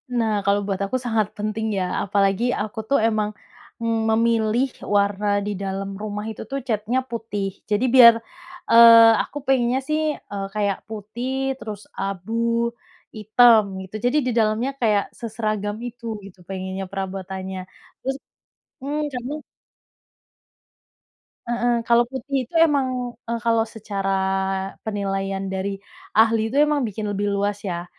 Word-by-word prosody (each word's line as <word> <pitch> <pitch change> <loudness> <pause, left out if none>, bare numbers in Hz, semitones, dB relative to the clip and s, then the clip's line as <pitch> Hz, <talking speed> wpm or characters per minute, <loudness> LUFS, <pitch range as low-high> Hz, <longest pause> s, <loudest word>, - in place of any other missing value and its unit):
Nah, 225 -2 +1
kalau 200 0 +3
buat 195 -2 -2
aku 230 - -3
sangat 220 -3 +1
penting 215 +1 -2
ya, - - 0 0.2
apalagi 195 +2 +1 0.2
aku 215 +1 -5
tuh 280 - +4
emang, 215 -1 0 0.5
mmm, 230 0 +1
memilih 230 +2 +2 0.3
warna 200 0 +1 0.2
di 210 - -2
dalam 195 0 -3
rumah 210 0 -4
itu - - -9
tuh 275 - -1
catnya 225 +3 0
putih. 215 -4 -3 0.2
Jadi 210 +4 +1
biar, 235 -2 +10 0.6
eee, 230 -1 +9
aku 290 - -7
pengennya 255 -1 +2
sih, 305 0 +1 0.3
eee, 195 -1 -3
kayak 200 -2 +1
putih 220 +4 -5 0.3
terus 210 -2 -7 0.2
abu 195 +2 -4 0.8
hitam 220 +1 +6 0.2
gitu, 190 +3 -11
jadi 265 +5 +3
di - - +1
dalamnya 220 +5 +1
kayak 210 -3 +3 0.2
seseragam 215 -2 -2
itu 240 0 -11 0.2
gitu 190 -1 -14
pengennya 190 0 -4
perabotannya, 190 -1 -5 0.4
terus 270 0 -2 0.7
hmm, 290 +2 -2
catnya 260 +5 -4 2.1
Heeh, 240 0 +1
kalau 235 0 +5
putih 275 +1 -4
itu - - -32
emang 280 -4 +1 0.4
eee, 235 0 -2
kalau 230 -1 +3
secara 200 -2 -3 0.7
penilaian 195 -2 -2
dari 195 +1 -2 0.4
ahli 225 0 +5
itu 275 - -2
emang 295 -1 +1
bikin 210 +1 -5
lebih 205 +1 -1
luas 200 0 0
ya, 175 -2 -3
215 Hz, 135 wpm, -23 LUFS, 200-235 Hz, 2.1 s, biar